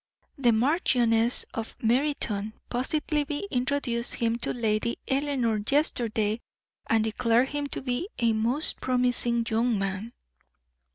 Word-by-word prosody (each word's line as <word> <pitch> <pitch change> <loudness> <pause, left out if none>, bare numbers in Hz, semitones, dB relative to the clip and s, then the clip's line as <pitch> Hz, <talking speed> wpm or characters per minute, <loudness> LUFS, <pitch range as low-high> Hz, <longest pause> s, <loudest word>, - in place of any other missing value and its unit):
The 245 -4 +3
Marchioness 235 -2 +2
of 225 -1 -5
Meriton 230 -4 0 0.2
positively 295 +5 -1
introduced 250 -2 0
him 230 -1 0
to - - -1
Lady 225 -1 0
Eleanor 265 -5 0
yesterday, 230 -6 +1 0.5
and 225 -1 +3
declared 230 +3 +2
him 290 0 -2
to 275 - -4
be 255 +9 -2
a 230 -1 +2
'most 235 +8 +1
promising 245 -2 +1
young 230 0 +1
man!'" 195 +4 -3
240 Hz, 115 wpm, -27 LUFS, 225-275 Hz, 0.5 s, The